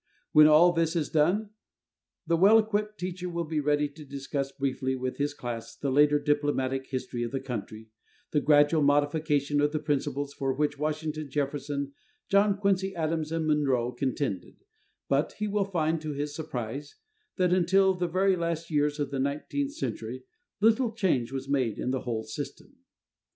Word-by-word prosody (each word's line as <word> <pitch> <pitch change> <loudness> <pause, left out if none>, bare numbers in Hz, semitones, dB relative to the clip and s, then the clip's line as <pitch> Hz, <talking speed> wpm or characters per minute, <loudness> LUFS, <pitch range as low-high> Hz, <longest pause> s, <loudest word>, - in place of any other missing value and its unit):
When 150 0 +8
all 160 +3 +7
this 165 0 0
is 160 -3 0
done, 190 +8 +2 0.7
the 170 - +2
well 200 +6 +6
equipped 215 -1 0
teacher 180 0 -4
will 170 0 -2
be 155 -1 -2
ready 145 0 +1
to 150 +2 -12
discuss 140 0 -4
briefly 130 -1 -2
with 130 0 -4
his 145 0 -1
class 115 -3 -6
the 140 - -2
later 145 +2 +5
diplomatic 145 -3 0
history 125 -2 -4
of 120 - -1
the 135 - -2
country, 110 -3 -7 0.4
the 150 - +2
gradual 150 +2 +4
modification 145 0 +2
of 145 0 +2
the - - +1
principles 145 -1 -2
for 135 -2 -1
which 145 +1 -1
Washington, 155 0 -3
Jefferson, 140 0 -3 0.4
John 200 0 +4
Quincy 195 -1 0
Adams 160 -1 -1
and 165 -1 -1
Monroe 135 -6 +1
contended, 125 -5 -3 0.4
but 140 +3 +1
he 210 - -3
will 205 -1 0
find 165 -4 0
to 155 -1 -4
his 145 +1 -3
surprise 140 -2 -5 0.4
that 180 -2 +2
until 190 +2 +4
the 180 -1 -2
very 190 +3 +2
last 170 -1 -3
years 150 0 +1
of 145 -1 -2
the 135 - -2
nineteenth 150 - -2
century 320 - -5 0.4
little 225 +2 +3
change 165 - 0
was 135 0 -5
made 130 -6 0
in 125 - -2
the 130 -1 -1
whole 115 -3 -3
system. 140 - -8
150 Hz, 170 wpm, -28 LUFS, 140-170 Hz, 0.7 s, When